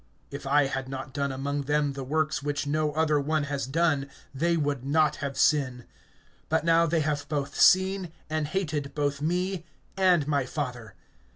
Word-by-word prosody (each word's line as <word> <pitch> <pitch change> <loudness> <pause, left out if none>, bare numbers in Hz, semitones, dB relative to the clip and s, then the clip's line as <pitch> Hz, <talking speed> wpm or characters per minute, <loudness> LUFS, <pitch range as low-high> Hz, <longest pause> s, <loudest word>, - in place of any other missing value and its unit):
(24)If 140 0 -6
I 145 +1 +4
had 135 -1 -3
not 130 -1 -6
done 140 0 -1
among 140 +2 -2
them 145 -1 +1
the 135 0 -5
works 155 +2 0
which 145 0 -2
no 150 +1 0
other 155 -1 +2
one 155 +1 0
has 140 -3 -3
done, 145 -1 +1 0.2
they 170 +5 +1
would 145 -4 -1
not 150 +2 +2
have 140 -1 -4
sin; 130 -5 +2 0.6
but 160 0 +1
now 165 0 +4
they 165 0 +1
have 145 -1 -2
both 145 -2 -2
seen 190 -1 +4 0.2
and 155 -1 -1
hated 155 -5 -3
both 145 -1 -1
me 180 +3 -1 0.3
and 180 -6 +3
my 140 -2 +1
Father. 125 -8 -5
145 Hz, 175 wpm, -27 LUFS, 140-160 Hz, 0.6 s, I